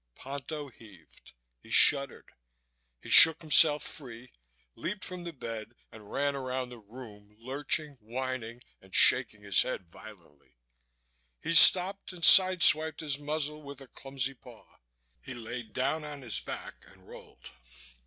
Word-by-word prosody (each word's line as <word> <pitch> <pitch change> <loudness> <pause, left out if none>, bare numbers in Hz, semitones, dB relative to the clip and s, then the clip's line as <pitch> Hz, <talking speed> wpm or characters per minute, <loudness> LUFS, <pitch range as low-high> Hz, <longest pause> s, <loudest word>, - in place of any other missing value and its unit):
Ponto 140 +2 -8
heaved. 100 - -20 0.3
He - - -21
shuddered. 140 -3 +3 0.7
He - - -12
shook 160 -1 +8
himself 150 -1 +3
free, 125 -4 -11 0.4
leaped 190 +2 -7
from 180 -1 -10
the 170 - -7
bed 115 -5 -10 0.2
and 105 -2 -16
ran 140 0 -3
around 130 -1 -6
the 120 -1 -13
room, 105 -2 -15
lurching, 145 +5 -3
whining 120 0 -7 0.2
and 95 -1 -12
shaking 110 -5 +4
his 100 -2 +3
head 95 -8 -5
violently. 90 - -18 0.8
He 165 - -5
stopped 185 +3 +4
and 175 -2 -12
sideswiped 170 -5 +5
his 145 -3 -4
muzzle 150 0 -5
with 140 -2 -12
a 135 - -13
clumsy 135 0 -5
paw. 125 -3 -18 0.6
He 130 - -10
lay 120 +1 -8
down 130 +7 -4
on 145 -2 -10
his 115 -5 -3
back - - -10
and - - -21
rolled. - - -16
130 Hz, 140 wpm, -27 LUFS, 115-150 Hz, 0.8 s, shook